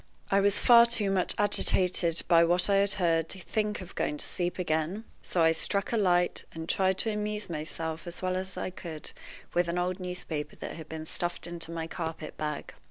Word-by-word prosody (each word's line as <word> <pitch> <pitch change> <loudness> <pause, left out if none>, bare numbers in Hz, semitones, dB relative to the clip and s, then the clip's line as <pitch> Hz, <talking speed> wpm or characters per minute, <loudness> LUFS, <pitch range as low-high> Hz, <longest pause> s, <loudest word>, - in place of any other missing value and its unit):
I 195 - +5
was 200 0 +3
far 235 -1 +7
too 220 -4 +2
much 185 -2 +1
agitated 180 -4 +2
by 170 -1 +6
what 175 +3 +3
I 200 - +5
had 200 0 +3
heard 165 -3 +1
to 190 - -3
think 210 +2 -2
of 185 - -10
going 150 - -1
to - - -1
sleep 175 -1 -2
again, 170 +4 -1 0.2
so 170 - +1
I 160 - +6
struck 200 +4 0
a - - +1
light, 180 -4 +2
and 160 0 -6
tried 190 +1 +1
to 225 - 0
amuse 210 -2 -3
myself 160 +1 -4
as 170 - -2
well 185 0 -1
as 190 0 -4
I - - -3
could 165 -4 -8 0.4
with 175 0 +2
an 170 +1 -2
old 180 +1 -1
newspaper 180 -5 -4
that - - -7
had 160 -2 -10
been 160 0 -6
stuffed 175 +2 -2
into 170 -1 -5
my 165 -1 -4
carpet 160 -1 -5
bag. 150 -1 -4
175 Hz, 210 wpm, -29 LUFS, 165-195 Hz, 0.4 s, far